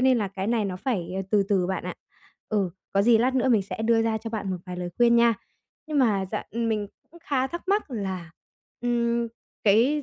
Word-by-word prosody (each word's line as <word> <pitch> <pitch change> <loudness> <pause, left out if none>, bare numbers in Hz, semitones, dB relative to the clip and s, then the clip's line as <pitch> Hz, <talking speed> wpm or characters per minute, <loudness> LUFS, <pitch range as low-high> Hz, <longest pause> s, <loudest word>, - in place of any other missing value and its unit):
nên 260 -1 +4
là 205 -3 -1
cái 190 0 -4
này 225 -2 +1
nó 185 -2 -3
phải 185 -5 -2 0.2
từ 205 -2 +4
từ 190 -3 +2
bạn 190 +1 -2
ạ. - - -4 0.5
Ừ, 200 -5 +1 0.2
có 195 - +3
gì 230 +1 +6
lát 255 +3 +2
nữa 260 0 +2
mình 220 -5 +4
sẽ 200 +3 -5
đưa 225 0 +3
ra 225 -1 0
cho 225 +1 -6
bạn 215 -3 -3
một 185 - -1
vài 180 0 -5
lời 180 0 -3
khuyên 235 -1 +5
nha. 235 -1 +5 0.5
Nhưng 305 -2 0
mà 210 -7 +3
dạ - - -2
mình 220 -2 0 0.2
cũng 340 +1 -16
khá 265 -2 +1
thắc 345 +6 -7
mắc 405 -5 +1
là, 190 -7 -4 0.5
ừm, 235 -1 +1 0.4
cái 235 +9 +4
225 Hz, 220 wpm, -26 LUFS, 200-245 Hz, 0.5 s, gì